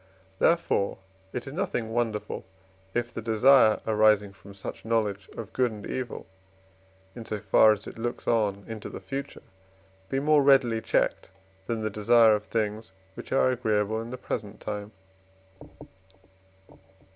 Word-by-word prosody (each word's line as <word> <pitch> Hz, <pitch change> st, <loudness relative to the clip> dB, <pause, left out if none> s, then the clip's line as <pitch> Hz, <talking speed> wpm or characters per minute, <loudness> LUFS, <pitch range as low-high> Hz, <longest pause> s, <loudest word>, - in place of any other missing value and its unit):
Therefore 165 Hz, -12 st, +2 dB, 0.3 s
it 125 Hz, -, -5 dB
is 135 Hz, -, -7 dB
nothing 145 Hz, -, -2 dB
wonderful, 115 Hz, -3 st, -2 dB, 0.5 s
if 120 Hz, 0 st, -1 dB
the -, -, -5 dB
desire 110 Hz, +1 st, +5 dB
arising 105 Hz, -2 st, +3 dB
from 100 Hz, 0 st, -15 dB
such 95 Hz, -, -8 dB
knowledge 105 Hz, -4 st, -1 dB
of 115 Hz, -4 st, -7 dB
good 125 Hz, -2 st, +1 dB
and 105 Hz, -1 st, -9 dB
evil, 130 Hz, -2 st, -5 dB, 0.9 s
in 120 Hz, -, -7 dB
so 110 Hz, -1 st, -4 dB
far 110 Hz, +2 st, +5 dB
as 105 Hz, -1 st, -2 dB
it -, -, -9 dB
looks 120 Hz, +1 st, -4 dB
on 105 Hz, -4 st, +1 dB
into 110 Hz, -2 st, -7 dB
the -, -, -8 dB
future, 140 Hz, 0 st, -6 dB, 0.7 s
be 135 Hz, -, 0 dB
more 150 Hz, +1 st, +4 dB
readily 130 Hz, -5 st, +4 dB
checked 115 Hz, -, 0 dB, 0.4 s
than 115 Hz, -1 st, -2 dB
the 110 Hz, -, -1 dB
desire 110 Hz, +2 st, +5 dB
of 105 Hz, 0 st, -1 dB
things 110 Hz, -2 st, -3 dB, 0.2 s
which -, -, -10 dB
are 130 Hz, -1 st, +3 dB
agreeable 110 Hz, -3 st, 0 dB
at 115 Hz, -, -7 dB
the 130 Hz, -, -6 dB
present 105 Hz, -4 st, -5 dB
time. 105 Hz, 0 st, -5 dB
110 Hz, 145 wpm, -27 LUFS, 105-120 Hz, 0.9 s, desire